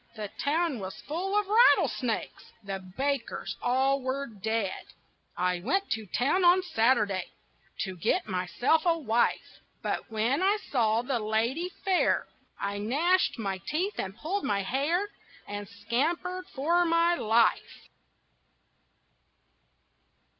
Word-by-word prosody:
The 210 -3 -6
town 310 -2 +1
was 190 -1 -7
full 375 +7 -2
of 415 - -2
rattlesnakes 405 - +2
The 195 -1 -4
bakers 260 +9 -3
all 265 +2 +2
were 260 +2 -2
dead. 220 -3 -3 0.6
I 180 -1 +1
went 390 - -1
to 220 -1 -2
town 280 - +1
on 355 +1 +6
Saturday 220 - +2 0.6
To 190 -3 -3
get 225 - 0
myself 195 - +1
a 335 -1 +4
wife, 240 -6 0 0.2
But - - -3
when 230 +7 0
I 395 +3 +3
saw 230 -3 +2
the 250 -1 -1
lady 230 +11 0 0.2
fair 375 -2 +2 0.3
I 200 0 -3
gnashed 305 - +2
my 195 -4 -3
teeth 355 - -2
and 195 +1 -4
pulled 380 +6 -2
my 200 -1 0
hair 295 - 0 0.4
And 205 0 -6
scampered 330 - -2
for 335 +5 +1
my 335 0 +3
life. 230 -7 +1
260 Hz, 125 wpm, -28 LUFS, 215-340 Hz, 0.6 s, on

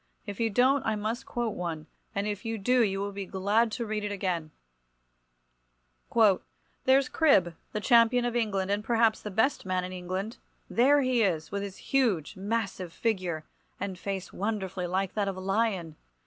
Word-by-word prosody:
If 200 - -7
you 230 -1 +2
don't 260 +6 +3
I 220 - 0
must 215 +3 -3
quote 240 -3 -2
one, 165 -3 -4 0.3
and 200 +1 0
if 205 0 -3
you 225 -1 -2
do 250 +5 +3
you 195 -3 +1
will 200 0 -2
be 200 -1 -6
glad 205 +5 +1
to 240 -2 -2
read 215 -1 -2
it 205 - -2
again— 180 -5 -2 2.4
"There's 265 0 +5
Cribb, 195 - +3 0.2
the 210 - -2
Champion 235 +2 +4
of 240 -1 -1
England, 200 -5 0
and 205 +1 0
perhaps 225 -1 +2
the 210 - -5
best 225 +8 +1
man 185 -1 -1
in 185 0 -5
England; 185 +6 -4 0.3
there 280 +5 +4
he 255 -3 +2
is, 170 -7 0
with 200 - -2
his 200 -1 -6
huge, 225 - 0
massive 195 -3 -2
figure, 180 -6 -1 0.4
and 195 -1 -3
face 195 -1 -4
wonderfully 190 -3 -2
like 190 +1 -1
that 205 -2 0
of 195 -1 -3
a - - -5
lion. 195 -4 -1
205 Hz, 175 wpm, -28 LUFS, 185-230 Hz, 2.4 s, There's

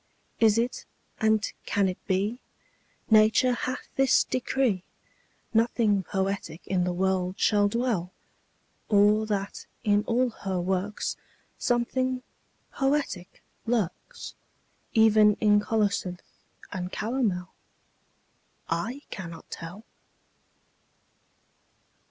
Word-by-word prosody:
Is 225 -1 +5
it, 240 +2 -1 0.3
and 220 -1 +3 0.2
can 200 -1 +2
it 185 - -5
be, 205 +5 0 0.7
Nature 220 +3 +5
hath 255 +2 -4
this 270 0 +5
decree, 255 -6 0 0.7
Nothing 225 -3 +3
poetic 190 -3 -3
in 180 -2 +1
the 180 - 0
world 185 0 0
shall 205 -1 +4
dwell? 215 -5 -1 0.8
Or 210 +1 +4
that 200 -2 -3 0.2
in 205 -2 +3
all 245 +1 +2
her 190 -4 -3
works 190 +3 -2 0.4
Something 255 +1 0 0.5
poetic 270 -10 -1 0.2
lurks, 230 - -2 0.6
Even 215 -1 +6
in 210 -1 +4
colocynth 205 -4 0 0.5
and 180 -1 -4
calomel? 210 -7 -1 1.2
I 230 - -2
cannot 170 -3 -8
tell. 180 +6 -8
210 Hz, 90 wpm, -27 LUFS, 190-235 Hz, 1.2 s, Even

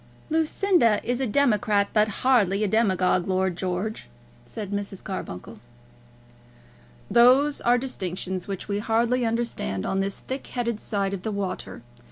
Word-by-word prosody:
"Lucinda 320 - +3
is 245 +2 -1
a 265 - 0
democrat, 215 -4 +2
but 215 0 +4 0.2
hardly 210 -6 +3
a - - +2
demagogue, 190 -4 +2
Lord 190 -1 0
George," 185 - -3 0.4
said 210 -3 -6
Mrs. 200 -2 -4
Carbuncle. 115 - -6 1.5
"Those 260 +5 +5
are 240 +1 +4
distinctions 185 -7 -4
which 195 -2 -5
we 205 0 -1
hardly 235 +2 +1
understand 225 - -2
on 195 - 0
this 195 0 -1
thick 265 +1 -6
headed 235 -3 -2
side 200 -2 -1
of 195 - -4
the 220 - -3
water. 200 - -4
210 Hz, 140 wpm, -25 LUFS, 190-240 Hz, 1.5 s, Those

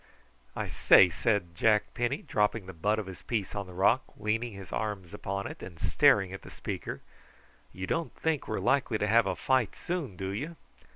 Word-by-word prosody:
"I - - -2
say," 90 -2 +6
said 100 -2 0
Jack 105 +3 +2
Penny, 120 +3 -1
dropping 105 -1 0
the 95 - -8
butt 105 +6 0
of 110 - -3
his 95 -1 -9
piece 110 -6 -2
on 100 -2 -4
the 90 - -11
rock, 100 +8 +4 0.2
leaning 110 +2 -1
his 95 -2 -10
arms 100 -5 -3
upon 100 0 -4
it, - - -7
and 85 -3 -9
staring 95 +1 +4
at 95 - -7
the - - -12
speaker. - - -5 0.7
"You 95 +1 -5
don't 165 - -2
think 160 -3 -1
we 110 - -2
are - - -1
likely 120 +2 +2
to 105 - 0
have 110 +1 +4
a 95 - 0
fight 130 +2 +1
soon, 165 - -4
do 95 +1 -4
you?" 145 +12 -4
105 Hz, 205 wpm, -29 LUFS, 95-120 Hz, 0.7 s, say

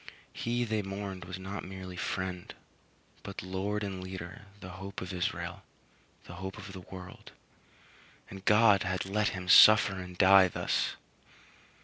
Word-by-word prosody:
He 120 +1 -1
they 110 -2 -1
mourned 95 -2 -6
was 90 +1 -6
not 95 +1 -6
merely 95 -1 -8
friend, 90 -1 -4 0.7
but 100 - -7
Lord 100 +3 -3
and 95 -2 -5
Leader, 95 +3 -8
the 95 - -9
Hope 100 +1 -6
of 90 0 -6
Israel; 90 -1 -3 0.6
the 90 - -11
hope 95 +1 -6
of 100 -1 -9
the 95 - -8
world; 90 0 -11 0.9
and 95 0 -10
God 105 -1 +5
had 95 0 -2
let 105 +2 0
him 90 0 -7
suffer 105 +2 +8
and 90 -1 -8
die 95 0 +7
thus! - - -1
95 Hz, 145 wpm, -30 LUFS, 95-100 Hz, 0.9 s, suffer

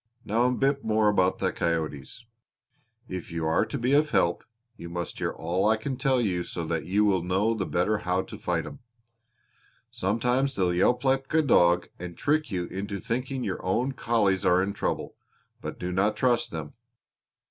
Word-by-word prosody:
Now 115 +4 +2
a - - +2
bit 135 +2 +1
more 110 -1 +3
about 95 -2 +2
the - - 0
coyotes. 80 - -3 0.8
If 90 -1 -6
you 85 -1 -2
are 80 0 +2
to 145 - -4
be 125 +2 +1
of 150 +1 +4
help 85 - +1 0.3
you 85 -4 -9
must 85 0 -5
hear - - 0
all 90 +5 -1
I 110 - +3
can 130 +5 -3
tell 130 -1 +1
you 90 -7 0
so 85 -1 -5
that 80 -1 -2
you 105 +3 +3
will 95 -4 +2
know 95 +6 +1
the 100 -5 -3
better 105 +5 +1
how 90 -1 0
to - - -10
fight - - -1
'em. - - -9 1.1
Sometimes 125 +7 0
they'll 90 -2 +1
yelp 120 +8 +2
like 135 0 +1
a 160 - +5
dog 90 -9 +4
and 90 -1 -7
trick 155 +1 +1
you 90 -4 -2
into 100 +2 -5
thinking 125 +4 -3
your 95 - -3
own 120 +9 0
collies 110 -7 +1
are 90 +1 +4
in 100 +1 -2
trouble; - - -3 0.4
but - - -6
do 90 0 -4
not 100 +4 +1
trust 125 -1 +2
them. 80 -3 -6
100 Hz, 190 wpm, -27 LUFS, 90-125 Hz, 1.1 s, a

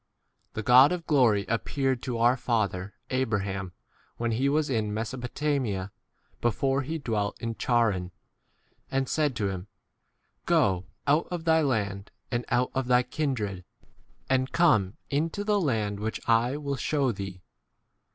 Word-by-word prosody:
The 110 - -4
God 130 +6 +7
of 175 -2 -3
glory 120 - +3
ap 115 0 0
peared 135 -3 0
to 125 -3 -3
our 120 +2 +4
father 105 -5 -1 0.2
Abraham 100 -7 -1 0.5
when 120 0 -1
he 130 +5 +1
was 150 +1 +1
in 110 -5 -1
Mesopotamia, 120 -3 -2 0.5
8 - - -40
before 135 +4 +1
he 155 +5 -3
dwelt 110 -8 -2
in 115 -1 -3
Charran, 110 -7 +1 0.8
and 135 0 0
said 150 -3 0
to 100 -4 0
him, 95 0 -5 0.8
Go 95 -1 +2 0.2
out 150 +3 +3
of 175 -2 -4
thy 160 -1 +4
land 105 -8 -1 0.2
and 120 -1 -1
out 125 +1 +1
of 135 -1 -1
thy 125 0 +4
kindred, 120 - -2 0.6
and 130 0 +1
come 110 - +3
into 160 +7 -1
the 210 0 +1
u 180 - 0
land 105 -6 0
which 110 +1 -3
I 120 +4 +3
will 140 -2 -3
shew 145 +3 -1
4 130 -3 +2
thee. 95 -2 -7
120 Hz, 155 wpm, -27 LUFS, 105-140 Hz, 0.8 s, God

